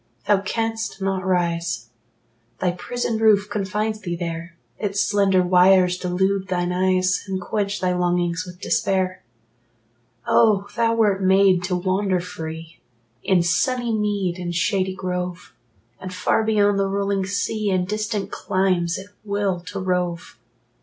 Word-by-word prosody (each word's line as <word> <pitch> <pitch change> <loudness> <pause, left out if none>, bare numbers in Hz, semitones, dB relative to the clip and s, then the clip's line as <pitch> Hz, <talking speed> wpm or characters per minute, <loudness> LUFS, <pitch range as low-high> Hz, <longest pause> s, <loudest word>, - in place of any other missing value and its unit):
Thou 200 -2 +3
canst 225 +1 -3
not 190 -1 -1
rise: 170 -2 -1 0.7
Thy 180 - +1
prison 225 +5 -3
roof 210 -2 +4
confines 210 +2 -2
thee 175 -4 -4
there; 170 0 -5 0.2
Its 200 -2 -2
slender 195 -3 +3
wires 180 0 +5
delude 190 +2 0
thine 180 -1 -1
eyes, 185 0 +1
And 190 -1 -2
quench 200 +3 -2
thy 180 -1 +1
longings 175 -1 0
with 180 -1 -11
despair. 185 -2 0 1.0
Oh, 210 -3 +3
thou 230 -1 +2
wert 205 -4 +2
made 190 -1 +4
to 185 -1 -1
wander 185 +1 0
free 160 -2 -8 0.4
In 185 -3 +2
sunny 240 +8 +1
mead 205 -4 -1
and 175 -1 -4
shady 190 0 0
grove, 180 -7 -4 0.5
And 185 - -7
far 185 +4 +1
beyond 205 -2 +2
the 195 - +1
rolling 195 -1 -1
sea, 205 +1 -1
In 185 -2 +1
distant 210 0 -3
climes, 185 -2 0
at 195 +2 -9
will 200 -3 -1
to 195 +1 -5
rove! 180 -2 -2
190 Hz, 140 wpm, -22 LUFS, 180-205 Hz, 1.0 s, wires